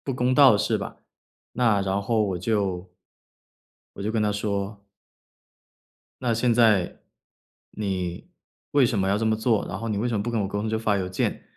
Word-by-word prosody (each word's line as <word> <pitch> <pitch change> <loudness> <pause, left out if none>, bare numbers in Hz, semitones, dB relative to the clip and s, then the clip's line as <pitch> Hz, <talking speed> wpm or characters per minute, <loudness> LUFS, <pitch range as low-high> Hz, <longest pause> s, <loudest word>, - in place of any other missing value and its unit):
不 135 - -2
公 125 0 +1
道 135 -2 +7
的 105 - +2
事 - - 0
吧。 - - -7 0.5
那 115 -5 +2
然 95 +1 -1
后 110 +2 +1
我 95 -4 -1
就 95 -2 -1 1.1
我 - - -10
就 110 +2 -2
跟 110 - +1
他 105 - +1
说 100 0 -3 1.4
“那 125 -2 +1
现 115 +2 +2
在 110 -6 +3 0.7
你 95 - -4 0.4
为 140 -4 +5
什 115 -4 -1
么 95 - +1
要 100 +2 +2
这 115 - -1
么 110 0 +2
做？ 110 -1 +1
然 90 +2 -5
后 115 +2 -4
你 105 - -1
为 120 - 0
什 120 - -2
么 100 - -1
不 120 - -3
跟 115 - -1
我 100 - 0
沟 100 0 -3
通 110 - -2
就 110 - -1
发 110 -2 +1
邮 95 -2 -2
件， 90 - -2
105 Hz, 220 characters per minute, -25 LUFS, 100-115 Hz, 1.4 s, 道